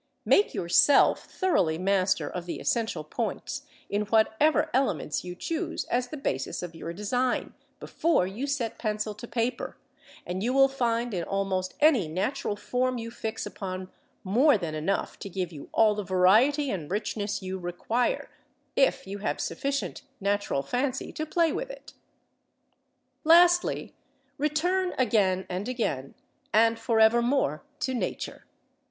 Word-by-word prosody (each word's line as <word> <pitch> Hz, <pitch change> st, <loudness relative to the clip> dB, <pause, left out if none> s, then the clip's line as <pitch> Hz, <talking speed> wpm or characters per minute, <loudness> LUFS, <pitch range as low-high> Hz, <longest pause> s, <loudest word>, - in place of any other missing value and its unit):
Make 410 Hz, -, +4 dB
yourself 180 Hz, +11 st, +4 dB
thoroughly 180 Hz, -, +1 dB
master 185 Hz, -4 st, +1 dB
of 175 Hz, +2 st, -6 dB
the -, -, -4 dB
essential 230 Hz, -2 st, -1 dB
points, -, -, -4 dB, 0.2 s
in 205 Hz, -, -1 dB
whatever 220 Hz, +8 st, +3 dB
elements 260 Hz, -, 0 dB
you 180 Hz, 0 st, -6 dB
choose 320 Hz, -, -3 dB
as 245 Hz, +1 st, +1 dB
the 305 Hz, -, -7 dB
basis 135 Hz, -, -3 dB
of 175 Hz, -1 st, -6 dB
your 165 Hz, +1 st, -6 dB
design, 245 Hz, +7 st, -1 dB, 0.3 s
before 325 Hz, -, +1 dB
you 215 Hz, +9 st, -4 dB
set 245 Hz, -6 st, -2 dB
pencil 215 Hz, -1 st, -2 dB
to 225 Hz, +4 st, -10 dB
paper; 240 Hz, +1 st, -2 dB, 0.5 s
and 180 Hz, +2 st, -3 dB
you 240 Hz, +4 st, 0 dB
will 270 Hz, 0 st, +6 dB
find 240 Hz, -3 st, -1 dB
in 175 Hz, -2 st, -1 dB
almost 190 Hz, -1 st, -2 dB
any 290 Hz, -, +4 dB
natural 190 Hz, -, -2 dB
form 250 Hz, +4 st, -1 dB
you 230 Hz, 0 st, -5 dB
fix 225 Hz, -1 st, -4 dB
upon 185 Hz, -1 st, -6 dB, 0.3 s
more 240 Hz, +8 st, +4 dB
than 170 Hz, -5 st, -4 dB
enough 155 Hz, +6 st, -2 dB
to 200 Hz, -, -6 dB
give 185 Hz, -2 st, -3 dB
you 145 Hz, -4 st, -10 dB
all 220 Hz, -1 st, +4 dB
the 210 Hz, -, -3 dB
variety 220 Hz, +11 st, +4 dB
and 165 Hz, -7 st, -4 dB
richness 205 Hz, 0 st, -2 dB
you 190 Hz, 0 st, -4 dB
require, 185 Hz, +7 st, -1 dB, 0.5 s
if -, -, +2 dB
you 200 Hz, +1 st, -6 dB
have 145 Hz, -7 st, -2 dB
sufficient 275 Hz, -, -2 dB, 0.2 s
natural 200 Hz, -8 st, 0 dB
fancy 255 Hz, -, -2 dB
to 310 Hz, -, -4 dB
play 335 Hz, +1 st, +2 dB
with -, -, -3 dB
it. -, -, -11 dB, 1.3 s
Lastly: 350 Hz, +2 st, +4 dB, 0.5 s
return 355 Hz, +6 st, +1 dB
again 200 Hz, -6 st, +2 dB
and 190 Hz, +6 st, -4 dB
again, 180 Hz, -, -2 dB, 0.4 s
and 225 Hz, +1 st, +4 dB
for 225 Hz, -1 st, +1 dB
evermore, 235 Hz, -, +3 dB, 0.2 s
to 260 Hz, -, 0 dB
Nature. 245 Hz, -, -4 dB
220 Hz, 145 wpm, -27 LUFS, 185-260 Hz, 1.3 s, will